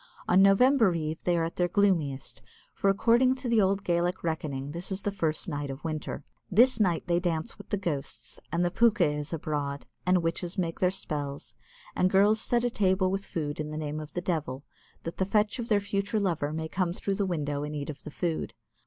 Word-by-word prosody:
On 185 +2 +5
November 200 0 +5
Eve 160 0 -3
they 175 -1 +2
are 165 - +1
at 165 - -4
their 175 - +2
gloomiest, 170 -8 0 0.3
for, 200 - +1
according 235 +6 +4
to 255 -1 -5
the 230 -2 +4
old 195 0 +1
Gaelic 175 +1 0
reckoning, 145 -4 -3
this 170 +5 -5
is 190 0 -3
the 205 - 0
first 160 -6 -1
night 145 -3 -3
of 135 +2 -7
winter. 155 -2 -4 0.3
This 240 +6 +5
night 180 -6 +2
they 175 -1 +2
dance 165 -3 -2
with - - -12
the 205 - 0
ghosts, 155 -8 -4
and 175 +1 +1
the 175 - 0
pooka 225 -2 +4
is 150 0 -2
abroad, 145 -3 -3 0.2
and 180 -1 +3
witches 170 +3 -2
make 170 -3 -2
their 180 - +4
spells, 145 -6 -4 0.4
and 185 - +3
girls 205 +3 +4
set 240 0 +1
a 245 - +1
table 190 -3 +2
with 195 0 -2
food 150 -3 -3
in 150 0 -3
the 155 - -5
name 155 0 -3
of 155 -1 -9
the 175 - -2
devil, 155 -7 -2 0.4
that 165 - -6
the - - +2
fetch 210 +3 +1
of 235 - -3
their 210 -2 +4
future 200 +2 -1
lover 165 -7 0
may 160 +1 -3
come 175 +1 -1
through 200 +2 -2
the 200 - 0
window 145 -5 -2
and 150 +1 -4
eat 145 +1 -3
of 145 - -11
the - - -7
food. 165 +1 -3
175 Hz, 220 wpm, -28 LUFS, 155-195 Hz, 0.4 s, On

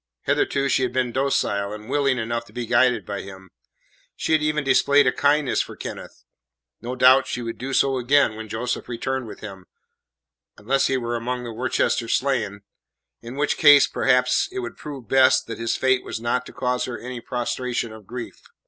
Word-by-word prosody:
Hitherto 140 0 +1
she 135 - +2
had 130 - 0
been 125 -2 0
docile 105 -7 0
and 105 0 -9
willing 140 -1 +1
enough 115 0 -2
to 105 - -19
be 120 0 -4
guided 120 +2 +2
by 100 -1 -4
him; 95 -1 -12 0.6
she - - -3
had 155 -1 +4
even 150 -1 0
displayed 140 +1 +4
a - - +4
kindness 145 -1 +2
for - - -7
Kenneth; - - -9 0.6
no 125 +2 -5
doubt 130 +1 +5
she 125 - -4
would 115 0 -6
do 135 +2 -5
so 135 0 +2
again 125 -2 +3
when 110 0 -8
Joseph 120 +4 -3
returned 130 +1 -3
with - - -10
him 95 -4 -10 0.9
unless 135 +6 +1
he 135 - +1
were 120 -1 -3
among 125 +1 -3
the 120 -1 -6
Worcester 120 0 0
slain, 115 -7 -1 0.6
in 120 +2 -9
which 145 +1 0
case, 145 -2 +7
perhaps, 125 - +2
it 385 - -7
would 360 -1 -6
prove 140 -6 -9
best 130 +2 +4
that 115 -1 -7
his 115 0 -1
fate 130 -1 +1
was - - -5
not 120 +2 -1
to - - -10
cause 125 -1 -1
her 120 - -5
any 125 -1 -7
prostration 120 -1 -3
of 110 -3 -13
grief. 125 0 -8
125 Hz, 195 wpm, -23 LUFS, 115-135 Hz, 0.9 s, case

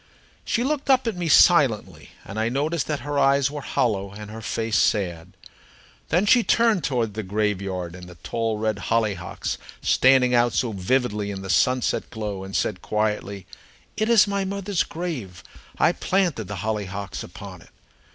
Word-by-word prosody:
She 235 - 0
looked 285 +1 -2
up 260 -1 +4
at 225 -4 -1
me 175 -1 -3
silently, 140 - +4 0.2
and 105 - -6
I 110 +1 +1
noticed 150 +6 -1
that 150 -2 -2
her 145 0 -2
eyes 140 0 +3
were 145 -1 -5
hollow, 100 -7 -1
and 105 0 -9
her 110 +1 -8
face 110 0 -2
sad. 90 -4 0 0.8
Then 175 +6 +2
she 240 +2 +5
turned 225 -8 +3
toward 120 -7 -1
the 110 - -3
graveyard 95 -3 -2
and 90 -1 -10
the 90 - -12
tall 115 +7 -2
red 110 -1 -1
hollyhocks 105 -6 -1 0.2
standing 130 -1 +4
out 120 -1 +3
so 120 - 0
vividly 105 +1 0
in 95 -1 -5
the 95 - -2
sunset 125 +7 +1
glow, 105 -3 -5
and 95 0 -7
said 100 - -1
quietly: 105 -2 -2 0.5
"It 215 +2 0
is 225 -5 +6
my 200 -1 -1
mother's 195 -1 -2
grave. 125 - -5 0.3
I - - +4
planted 180 - 0
the 100 -3 -5
hollyhocks 100 -3 -4
upon - - -10
it." - - -18
115 Hz, 170 wpm, -24 LUFS, 100-155 Hz, 0.8 s, is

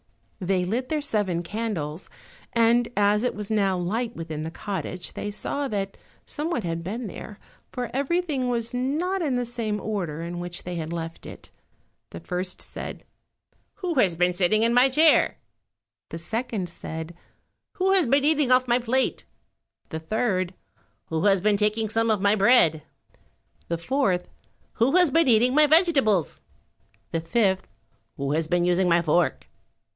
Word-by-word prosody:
They 185 -1 0
lit 240 +7 -2
their 305 -2 -1
seven 195 - 0
candles, 185 -6 -4 0.4
and 235 +1 +3
as 205 +1 +3
it 250 - -1
was 210 0 -5
now 195 -3 +2
light 225 +7 -2
within 160 -2 -5
the 160 - -4
cottage 185 0 -5
they 205 - -4
saw 280 +7 -3
that 195 -4 -3 0.3
someone 300 -5 -2
had 165 -1 -3
been 225 +7 -4
there, 205 +1 -8 0.3
for 245 -2 -4
everything 280 -1 0
was 235 0 -2
not 310 +10 -1
in 285 -6 0
the 245 0 0
same 225 -3 -2
order 180 -7 -3
in 175 +1 -5
which 175 0 -6
they 180 - -5
had 165 -2 -4
left 165 -1 -6
it. - - -11 0.6
The 85 - -8
first 180 +1 -4
said, - - -7 0.7
"Who 365 -3 -3
has 185 -8 +3
been 180 +1 +2
sitting 195 +5 +2
on 235 - +2
my 250 +2 +5
chair?" 310 +4 +4 0.7
The - - -6
second, 215 0 -3 1.0
"Who 380 0 +1
has 375 -7 +4
been 275 +3 +3
eating 300 -4 +3
off 255 0 +4
my 240 +1 +3
plate?" 255 +2 0 0.6
The 160 - -4
third, 185 0 -1 0.5
"Who 160 +3 -1
has 195 -2 +4
been 205 +1 +3
taking 215 +1 0
some 225 +1 +1
of 215 -2 +2
my 200 +1 +3
bread?" 195 -7 +4 0.9
The 170 - -1
fourth, 190 -2 0 0.5
"Who 250 +7 +2
has 360 -5 +5
been 330 +1 +3
eating 245 +1 +4
my 300 +1 +6
vegetables?" 285 - +3 0.7
The 165 - -1
fifth, 190 +2 +1 0.5
"Who 140 0 -2
has 155 +1 0
been 175 +1 +1
using 180 +1 +2
my 170 0 +3
fork?" 170 +2 +1
210 Hz, 160 wpm, -25 LUFS, 175-250 Hz, 1.0 s, my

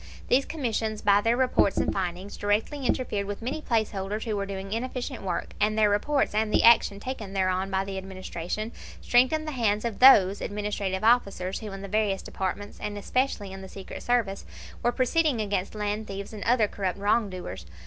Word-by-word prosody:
These 265 +2 +4
commissions 225 -7 -2
by 205 0 +5
their 230 +3 +2
reports 250 -6 +2
and - - +1
findings 185 +1 -3
directly 220 +7 -1
interfered 205 -6 -1
with 205 +2 -5
many 285 +6 -3
place 225 -6 0
holders 200 +2 -3
who 220 -3 -2
were 200 -1 -2
doing 195 0 -5
inefficient 255 +2 -4
work, 185 -3 -3
and 215 +1 +2
their 210 -1 +4
reports 275 +7 +1
and 215 0 +1
the - - +3
action 225 -3 +6
taken 215 -4 -6
thereon 190 0 0
by 190 0 0
the 195 -1 -4
Administration 190 +2 -5 0.3
strengthened 260 +6 +3
the - - -2
hands 220 -5 0
of 230 -3 -3
those 205 -7 +7
administrative 205 -2 -3
officers 200 -5 +2
who 215 -2 -7
in 195 0 -7
the - - -5
various 205 -1 0
departments, 200 +2 -4
and 205 0 -4
especially 210 -2 -1
in 190 0 -8
the 190 - -9
Secret 195 0 -8
Service, 230 -5 0 0.4
were 240 - +2
proceeding 265 +2 +1
against 200 -2 -2
land 210 +1 -2
thieves 200 +2 -6
and 210 - -6
other 230 -2 +3
corrupt 195 -2 -3
wrong 205 +2 +2
doers. 95 - -7
210 Hz, 190 wpm, -27 LUFS, 195-235 Hz, 0.4 s, those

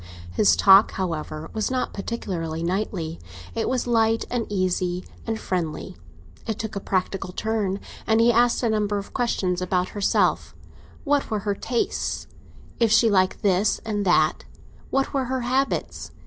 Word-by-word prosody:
His 90 +1 +4
talk, 195 - +6
however, 160 -4 -4
was 215 -1 -1
not 260 -1 -1
particularly 170 -7 -4
knightly; 175 -3 -2 0.3
it 225 - -1
was 255 -1 0
light 225 -1 +2
and 240 -2 -1
easy 185 -2 -1 0.2
and 225 -1 -2
friendly; 170 -4 -3 0.5
it 220 -2 -2
took 220 -2 -5
a - - -1
practical 190 0 -2
turn, 205 -1 -1 0.3
and 220 0 +4
he 235 +1 +5
asked 240 +2 +3
a 235 - +2
number 210 -1 0
of 200 - -7
questions 185 -7 0
about 180 0 0
herself—what 280 +7 -1
were 215 - -1
her 205 -1 0
tastes—if 230 0 -3
she 225 0 +5
liked 185 -2 +2
this 200 +1 +2
and 210 -2 -1
that—what 180 +9 -1
were 270 -2 0
her 260 +1 -2
habits. 260 +3 -1
205 Hz, 145 wpm, -24 LUFS, 180-230 Hz, 0.5 s, talk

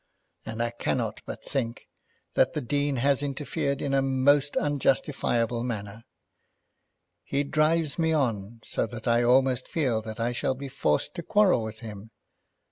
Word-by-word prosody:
And 115 +1 -2
I 120 - -1
cannot 120 - -2
but - - -7
think 120 -4 -3 0.5
that - - +3
the 150 - -2
Dean 145 +2 0
has 135 +2 +2
interfered 140 0 -2
in 140 - -1
a 135 - +4
most 135 +2 +3
unjustifiable 130 -5 +1
manner. 110 -2 -5 1.2
He 140 +1 0
drives 155 +1 +1
me 160 -1 +2
on, 115 -7 -1
so - - -1
that 115 +1 -8
I 120 0 +4
almost 130 +1 +3
feel 130 -9 0
that 110 0 -7
I 115 +1 +1
shall 125 +2 -1
be 135 +1 -7
forced 75 - 0
to - - -2
quarrel 190 - +3
with 110 0 -6
him. 105 -1 -8
130 Hz, 155 wpm, -27 LUFS, 115-145 Hz, 1.2 s, a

